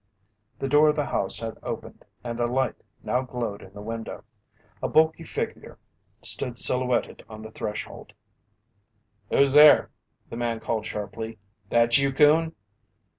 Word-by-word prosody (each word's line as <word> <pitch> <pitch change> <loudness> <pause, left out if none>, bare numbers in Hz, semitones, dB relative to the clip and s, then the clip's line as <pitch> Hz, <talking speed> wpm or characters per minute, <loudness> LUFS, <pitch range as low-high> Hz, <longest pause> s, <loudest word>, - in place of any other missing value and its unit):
The 135 - -3
door 150 +2 +5
of 150 - +1
the 150 -2 0
house - - +1
had 115 -1 -5
opened - - -7 0.2
and 120 -1 -5
a 120 - +1
light 130 0 0 0.3
now 125 - 0
glowed 120 -5 -5
in 95 - -13
the 105 0 -9
window. 115 +1 -6 0.6
A - - -1
bulky 160 +1 +3
figure - - -5 0.5
stood 120 -2 -1
silhouetted 125 0 0
on 110 0 -10
the 110 - -9
threshold. 105 -1 -6 1.2
"Who's 140 -1 +3
there?" 150 0 +7 0.4
the 115 - -8
man 120 -1 -2
called 110 -1 -3
sharply. 110 +2 -6 0.3
"That 115 +1 +4
you, 140 0 +1
Coon?" 155 +4 +4
120 Hz, 145 wpm, -25 LUFS, 115-140 Hz, 1.2 s, there